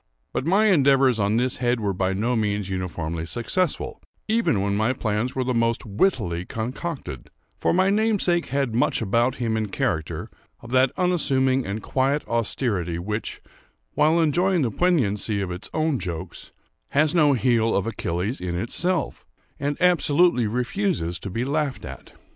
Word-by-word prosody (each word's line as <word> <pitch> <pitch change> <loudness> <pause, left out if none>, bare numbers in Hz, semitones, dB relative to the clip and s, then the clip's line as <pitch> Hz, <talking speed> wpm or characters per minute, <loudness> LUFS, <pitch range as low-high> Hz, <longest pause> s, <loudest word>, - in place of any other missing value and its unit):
But 135 - -2
my 200 +5 +4
endeavours 135 - +4
on 100 +2 +1
this 125 +1 0
head 120 -1 0
were 100 -3 -1
by 95 +1 0
no 115 +6 0
means 105 -3 -1
uniformly 85 -3 -3
successful, 145 - -2 0.3
even 220 - +2
when 100 +1 0
my 110 +5 +1
plans 115 +1 -2
were 130 - 0
the 125 0 -1
most 115 0 0
wittily 100 - 0
concocted; 115 - -5 0.3
for - - +1
my 185 +2 +3
namesake 205 -5 +1
had 135 -3 -1
much 115 0 +1
about 120 +5 +1
him, 115 -4 -1
in 110 -1 -1
character, 125 - -2 0.3
of 120 - -12
that 130 0 +4
unassuming 135 - +2
and 100 +3 -4
quiet 135 +3 0
austerity 105 -7 -1
which, 105 +5 -4 0.5
while 155 +3 +3
enjoying 175 +2 +2
the 120 - 0
poignancy 110 - +1
of 95 -2 -3
its 90 +2 -5
own 155 -4 0
jokes, 85 -4 -6 0.4
has 150 +1 +2
no 150 -5 +4
heel 115 -3 +2
of 100 - -1
Achilles 100 0 -3
in 90 -1 -3
itself, 170 - -1 0.3
and 145 +1 -2
absolutely 170 -7 +3
refuses 125 - -1
to 100 - -6
be 115 +6 -2
laughed 145 -1 -2
at. - - -10
125 Hz, 160 wpm, -24 LUFS, 105-150 Hz, 0.5 s, my